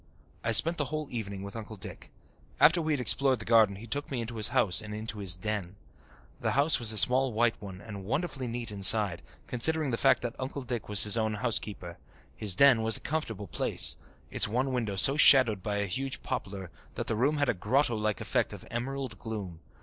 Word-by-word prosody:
I 115 Hz, -, 0 dB
spent 165 Hz, +9 st, +6 dB
the 145 Hz, -, 0 dB
whole 155 Hz, +2 st, -5 dB
evening 100 Hz, -4 st, -6 dB
with 100 Hz, +1 st, -9 dB
Uncle 110 Hz, -1 st, -8 dB
Dick. 100 Hz, -, -11 dB, 0.5 s
After 165 Hz, +2 st, +4 dB
we 155 Hz, -1 st, -1 dB
had 145 Hz, -, -2 dB
explored 130 Hz, +1 st, +2 dB
the -, -, -8 dB
garden 110 Hz, -4 st, +3 dB
he 105 Hz, +4 st, -11 dB
took 140 Hz, +5 st, -4 dB
me 130 Hz, -, -4 dB
into 115 Hz, 0 st, -6 dB
his 110 Hz, -1 st, +4 dB
house 95 Hz, -5 st, +1 dB
and 105 Hz, -1 st, -8 dB
into 110 Hz, 0 st, -6 dB
his 95 Hz, -3 st, +2 dB
"den." 100 Hz, -1 st, -5 dB, 0.6 s
The -, -, -2 dB
house 145 Hz, +3 st, +2 dB
was 115 Hz, -2 st, +1 dB
a 110 Hz, -, -1 dB
small 130 Hz, +5 st, +5 dB
white 115 Hz, +1 st, +1 dB
one 95 Hz, -2 st, -10 dB
and 100 Hz, -3 st, -9 dB
wonderfully 135 Hz, -, -4 dB
neat 115 Hz, -1 st, -4 dB
inside, 100 Hz, -2 st, +4 dB, 0.2 s
considering 150 Hz, +3 st, +1 dB
the 115 Hz, -, -1 dB
fact -, -, +2 dB
that 120 Hz, -1 st, -4 dB
Uncle 135 Hz, +1 st, -6 dB
Dick 120 Hz, -4 st, -6 dB
was 105 Hz, -1 st, +4 dB
his 105 Hz, +2 st, +3 dB
own 110 Hz, -1 st, -2 dB
housekeeper. 105 Hz, -6 st, -4 dB, 0.4 s
His 105 Hz, -5 st, -2 dB
"den" 135 Hz, -3 st, +5 dB
was 110 Hz, 0 st, +3 dB
a -, -, -15 dB
comfortable 115 Hz, -10 st, -5 dB
place, 90 Hz, -, +1 dB, 0.4 s
its -, -, +3 dB
one 125 Hz, +5 st, -2 dB
window 110 Hz, -5 st, -3 dB
so 135 Hz, +9 st, +4 dB
shadowed 130 Hz, -9 st, +5 dB
by 105 Hz, 0 st, -4 dB
a 100 Hz, -, -1 dB
huge 135 Hz, +8 st, -4 dB
poplar 95 Hz, -8 st, -6 dB, 0.2 s
that -, -, -4 dB
the 110 Hz, -, -3 dB
room 140 Hz, +7 st, 0 dB
had 145 Hz, -1 st, 0 dB
a -, -, +1 dB
grotto 120 Hz, +6 st, 0 dB
like 105 Hz, -2 st, -2 dB
effect -, -, -2 dB
of -, -, -11 dB
emerald 130 Hz, -1 st, -5 dB
gloom. 100 Hz, -7 st, -7 dB
115 Hz, 215 wpm, -28 LUFS, 105-130 Hz, 0.6 s, spent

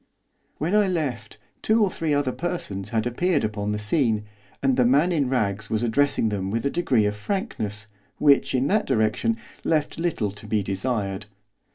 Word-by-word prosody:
When 165 Hz, +6 st, -1 dB
I 210 Hz, -1 st, +4 dB
left 135 Hz, -11 st, -3 dB, 0.2 s
two 220 Hz, 0 st, +3 dB
or 195 Hz, -, +1 dB
three 160 Hz, -2 st, -2 dB
other 145 Hz, -3 st, +1 dB
persons 125 Hz, -, -4 dB
had 115 Hz, -1 st, 0 dB
appeared 150 Hz, +5 st, +1 dB
upon 105 Hz, -1 st, -2 dB
the 105 Hz, -, -1 dB
scene, 110 Hz, -1 st, +1 dB, 0.4 s
and 135 Hz, -2 st, +3 dB
the 125 Hz, -, +4 dB
man 140 Hz, +9 st, +4 dB
in 145 Hz, -6 st, +1 dB
rags 110 Hz, -5 st, -1 dB
was 110 Hz, +1 st, 0 dB
addressing 120 Hz, 0 st, +2 dB
them 95 Hz, -2 st, -2 dB
with 115 Hz, +4 st, -2 dB
a 140 Hz, -, +1 dB
degree 125 Hz, -11 st, +2 dB
of 105 Hz, 0 st, 0 dB
frankness, 105 Hz, -, -3 dB, 0.3 s
which, 140 Hz, -2 st, +4 dB
in 130 Hz, +1 st, +2 dB
that 210 Hz, +7 st, +1 dB
direction, 110 Hz, -, +1 dB, 0.3 s
left 155 Hz, 0 st, 0 dB
little 155 Hz, -, -1 dB
to 105 Hz, +1 st, -11 dB
be 105 Hz, -1 st, +1 dB
desired. 100 Hz, 0 st, -2 dB
125 Hz, 180 wpm, -24 LUFS, 105-155 Hz, 0.4 s, I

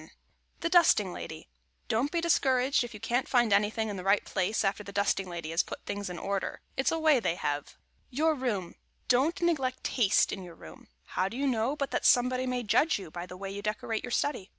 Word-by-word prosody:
[Sidenote: -, -, -18 dB, 0.4 s
THE 335 Hz, -, 0 dB
DUSTING 315 Hz, -, +4 dB
LADY] 160 Hz, -1 st, -8 dB, 0.4 s
Don't 255 Hz, +6 st, 0 dB
be 340 Hz, -, 0 dB
discouraged 265 Hz, -6 st, +2 dB
if 235 Hz, -2 st, -8 dB
you -, -, -9 dB
can't 245 Hz, +4 st, -1 dB
find 240 Hz, -5 st, +3 dB
anything 210 Hz, +2 st, +2 dB
in 205 Hz, -2 st, -4 dB
the 180 Hz, -, -6 dB
right 195 Hz, +2 st, +2 dB
place 195 Hz, +4 st, 0 dB
after 195 Hz, +2 st, -1 dB
the 200 Hz, -, -9 dB
dusting 195 Hz, -2 st, 0 dB
lady 170 Hz, -2 st, -5 dB
has 165 Hz, +2 st, +3 dB
put -, -, -9 dB
things 200 Hz, -1 st, -4 dB
in 180 Hz, -, -6 dB
order. 195 Hz, +1 st, -3 dB
It's 265 Hz, -, +1 dB
a 325 Hz, -, 0 dB
way 310 Hz, -4 st, +4 dB
they 180 Hz, -6 st, 0 dB
have. 145 Hz, -4 st, -2 dB
[Sidenote: -, -, -18 dB, 0.3 s
YOUR 315 Hz, +5 st, +2 dB
ROOM] 215 Hz, -, -3 dB, 0.3 s
Don't 270 Hz, +8 st, +2 dB
neglect 270 Hz, -7 st, 0 dB
taste 225 Hz, -7 st, +2 dB
in 195 Hz, -, -5 dB
your 175 Hz, -2 st, -10 dB
room. 80 Hz, -, -13 dB, 0.2 s
How 185 Hz, -, -1 dB
do 235 Hz, -, -7 dB
you 280 Hz, -, 0 dB
know 250 Hz, +1 st, +1 dB
but 280 Hz, -2 st, -3 dB
that -, -, +1 dB
somebody 255 Hz, +1 st, +3 dB
may 250 Hz, -1 st, -1 dB
judge 250 Hz, +9 st, +3 dB
you 185 Hz, -6 st, -9 dB
by 175 Hz, +1 st, -6 dB
the 180 Hz, -, -9 dB
way 195 Hz, +1 st, -6 dB
you 200 Hz, +1 st, -6 dB
decorate 215 Hz, +1 st, -3 dB
your 250 Hz, -, -5 dB
study? 245 Hz, -6 st, -1 dB
220 Hz, 230 wpm, -29 LUFS, 195-260 Hz, 0.4 s, DUSTING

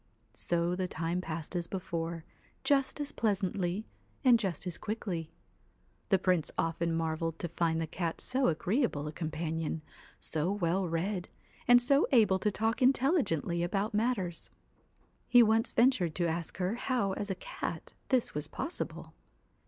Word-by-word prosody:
So 170 Hz, +1 st, 0 dB
the 185 Hz, 0 st, -1 dB
time 170 Hz, +1 st, -2 dB
passed 165 Hz, 0 st, -5 dB
as 170 Hz, -1 st, -1 dB
before, 170 Hz, -3 st, -4 dB, 0.4 s
just 280 Hz, 0 st, +2 dB
as 290 Hz, 0 st, -2 dB
pleasantly 195 Hz, -2 st, -1 dB, 0.4 s
and 245 Hz, -3 st, +6 dB
just 190 Hz, -6 st, -2 dB
as 180 Hz, -2 st, -3 dB
quickly. 190 Hz, -7 st, -3 dB, 0.8 s
The 195 Hz, -, +5 dB
Prince 180 Hz, -4 st, +2 dB
often 165 Hz, +1 st, 0 dB
marvelled 165 Hz, 0 st, -1 dB
to 175 Hz, -, -3 dB
find 165 Hz, -1 st, 0 dB
the 165 Hz, -, 0 dB
cat 165 Hz, +1 st, -3 dB
so 260 Hz, +1 st, +1 dB
agreeable 175 Hz, -, 0 dB
a -, -, -3 dB
companion, 160 Hz, 0 st, -3 dB, 0.4 s
so 160 Hz, +3 st, -1 dB
well 185 Hz, -1 st, 0 dB
read, 180 Hz, +3 st, -2 dB, 0.4 s
and 245 Hz, 0 st, +8 dB
so 275 Hz, +4 st, +3 dB
able 215 Hz, -7 st, +5 dB
to 210 Hz, -, +2 dB
talk 225 Hz, +4 st, -1 dB
intelligently 255 Hz, -, +2 dB
about 195 Hz, +5 st, -1 dB
matters. 210 Hz, -6 st, -1 dB, 0.8 s
He 245 Hz, -1 st, +7 dB
once 225 Hz, +1 st, +2 dB
ventured 225 Hz, -10 st, +3 dB
to 175 Hz, -1 st, +1 dB
ask 165 Hz, 0 st, -3 dB
her 185 Hz, +2 st, 0 dB
how 245 Hz, -6 st, 0 dB
as 205 Hz, +2 st, -4 dB
a 190 Hz, -, -1 dB
cat -, -, -6 dB, 0.2 s
this 255 Hz, -3 st, +2 dB
was 150 Hz, 0 st, -3 dB
possible. 335 Hz, -, -5 dB
180 Hz, 150 wpm, -31 LUFS, 165-225 Hz, 0.8 s, and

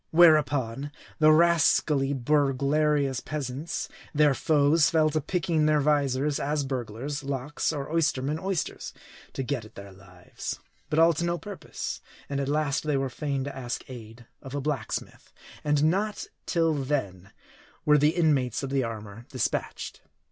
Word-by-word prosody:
Whereupon, 145 Hz, -5 st, +4 dB, 0.3 s
the 155 Hz, 0 st, +7 dB
rascally 155 Hz, -4 st, +4 dB
burglarious 140 Hz, 0 st, +1 dB
peasants, 145 Hz, +2 st, -4 dB, 0.3 s
their 150 Hz, -1 st, +5 dB
foes, 150 Hz, +2 st, +3 dB
fell 155 Hz, -2 st, +3 dB
to 155 Hz, +1 st, 0 dB
picking 165 Hz, -1 st, 0 dB
their 155 Hz, -1 st, +4 dB
visors; 145 Hz, -1 st, +1 dB
as 145 Hz, +1 st, 0 dB
burglars, 135 Hz, +2 st, -4 dB
locks; 140 Hz, +2 st, -2 dB
or 145 Hz, -3 st, -4 dB
oystermen, 150 Hz, -2 st, 0 dB
oysters; 190 Hz, -3 st, -3 dB, 0.4 s
to 135 Hz, -, -3 dB
get 130 Hz, -3 st, -2 dB
at 110 Hz, -, -15 dB
their 100 Hz, 0 st, -10 dB
lives. 90 Hz, -2 st, -8 dB, 0.3 s
But 150 Hz, -, -1 dB
all 165 Hz, +1 st, +6 dB
to 165 Hz, -, -3 dB
no 170 Hz, 0 st, 0 dB
purpose. 205 Hz, +1 st, -6 dB, 0.3 s
And 140 Hz, -1 st, -2 dB
at 140 Hz, 0 st, -1 dB
last 150 Hz, -1 st, 0 dB
they 150 Hz, -2 st, +1 dB
were 135 Hz, 0 st, -1 dB
fain 140 Hz, 0 st, -2 dB
to 140 Hz, 0 st, -6 dB
ask 125 Hz, -2 st, -5 dB
aid 115 Hz, -1 st, -10 dB, 0.2 s
of 135 Hz, +1 st, -8 dB
a -, -, 0 dB
blacksmith; 140 Hz, -5 st, -4 dB, 0.3 s
and 150 Hz, -1 st, +2 dB
not 200 Hz, +6 st, +1 dB, 0.2 s
till 165 Hz, -2 st, +2 dB
then, 130 Hz, -11 st, -2 dB, 0.6 s
were 150 Hz, 0 st, +5 dB
the 150 Hz, +3 st, +3 dB
inmates 140 Hz, -8 st, +2 dB
of 135 Hz, -, -4 dB
the 135 Hz, -1 st, +1 dB
armor 110 Hz, 0 st, -7 dB
dispatched. 130 Hz, -4 st, -3 dB
145 Hz, 150 wpm, -27 LUFS, 130-155 Hz, 0.6 s, the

